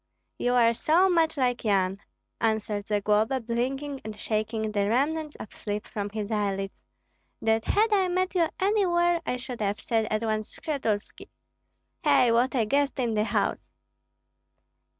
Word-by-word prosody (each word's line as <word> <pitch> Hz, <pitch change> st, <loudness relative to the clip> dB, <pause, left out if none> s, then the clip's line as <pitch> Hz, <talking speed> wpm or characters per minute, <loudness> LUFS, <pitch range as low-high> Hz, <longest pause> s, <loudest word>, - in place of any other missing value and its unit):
"You 245 Hz, 0 st, +1 dB
are 235 Hz, -1 st, +5 dB
so 335 Hz, +10 st, +3 dB
much 325 Hz, -3 st, +2 dB
like 250 Hz, -2 st, 0 dB
Yan," 195 Hz, -3 st, +1 dB, 0.4 s
answered 215 Hz, -2 st, -1 dB
Zagloba, 210 Hz, +4 st, +1 dB
blinking 260 Hz, +4 st, -3 dB
and 215 Hz, -1 st, -7 dB
shaking 220 Hz, 0 st, -2 dB
the 205 Hz, -1 st, 0 dB
remnants 300 Hz, +5 st, 0 dB
of 215 Hz, -, -10 dB
sleep 205 Hz, 0 st, -4 dB
from 205 Hz, -1 st, -4 dB
his 210 Hz, 0 st, -4 dB
eyelids, 195 Hz, -2 st, -2 dB, 0.6 s
"that 220 Hz, 0 st, +1 dB
had 430 Hz, +1 st, +2 dB
I 385 Hz, -2 st, +3 dB
met 365 Hz, +1 st, 0 dB
you 340 Hz, -3 st, +2 dB
anywhere 350 Hz, -4 st, +2 dB
I 250 Hz, -, 0 dB
should 250 Hz, -2 st, -7 dB
have 205 Hz, 0 st, -1 dB
said 225 Hz, -1 st, 0 dB
at 215 Hz, +1 st, -1 dB
once, 215 Hz, -1 st, -2 dB
'Skshetuski!' 230 Hz, -9 st, -3 dB, 0.7 s
Hei, 245 Hz, -2 st, +4 dB
what 245 Hz, +4 st, +2 dB
a 230 Hz, -4 st, +2 dB
guest 280 Hz, +4 st, 0 dB
in 240 Hz, -3 st, 0 dB
the 210 Hz, 0 st, +1 dB
house!" -, -, -1 dB
230 Hz, 150 wpm, -27 LUFS, 215-290 Hz, 0.7 s, are